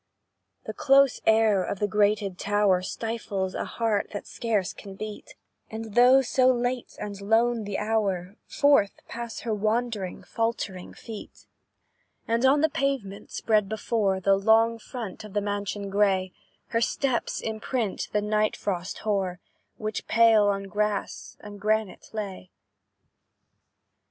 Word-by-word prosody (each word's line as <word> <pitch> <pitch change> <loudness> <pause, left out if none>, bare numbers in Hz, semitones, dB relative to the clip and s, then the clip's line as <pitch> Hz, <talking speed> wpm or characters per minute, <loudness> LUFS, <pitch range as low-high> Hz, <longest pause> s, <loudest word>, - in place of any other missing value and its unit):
The - - -5
close 275 -1 +4
air 220 -3 +4
of 195 - -3
the 205 - 0
grated 205 -2 +1
tower 205 -3 +2
Stifles 195 -2 -3
a - - -3
heart 225 -3 -1
that 205 - -5
scarce 215 -6 -1
can 195 -2 -10
beat, 215 +1 -8 0.3
And, 220 -1 -7
though 250 +3 +6
so 255 +1 +3
late 245 0 -2
and 200 -1 -6
lone 225 +2 +2
the 200 -1 -3
hour, 200 -4 -1
Forth 280 -9 +3
pass 235 -1 -6
her 225 - -2
wandering, 215 -2 -1
faltering 215 -5 -3
feet; 220 -2 -10 0.8
And 235 +3 +3
on 285 +2 +4
the 315 - +3
pavement 275 -10 -2
spread 210 -3 +1
before 215 -3 0
The 195 +1 +3
long 225 +3 +3
front 225 -4 -7
of 210 -2 -10
the 210 - +2
mansion 205 0 -3
grey, 195 -2 +2 0.4
Her 230 - 0
steps 245 0 0
imprint 220 -1 -2
the 210 0 0
night 215 0 +1
frost 185 -2 -3
hoar, 190 -4 0 0.4
Which 215 -1 -4
pale 225 -2 +5
on 195 -1 0
grass 205 +1 -3
and 205 -1 -10
granite 215 -1 -1
lay. 195 -4 -6
210 Hz, 135 wpm, -26 LUFS, 200-230 Hz, 0.8 s, though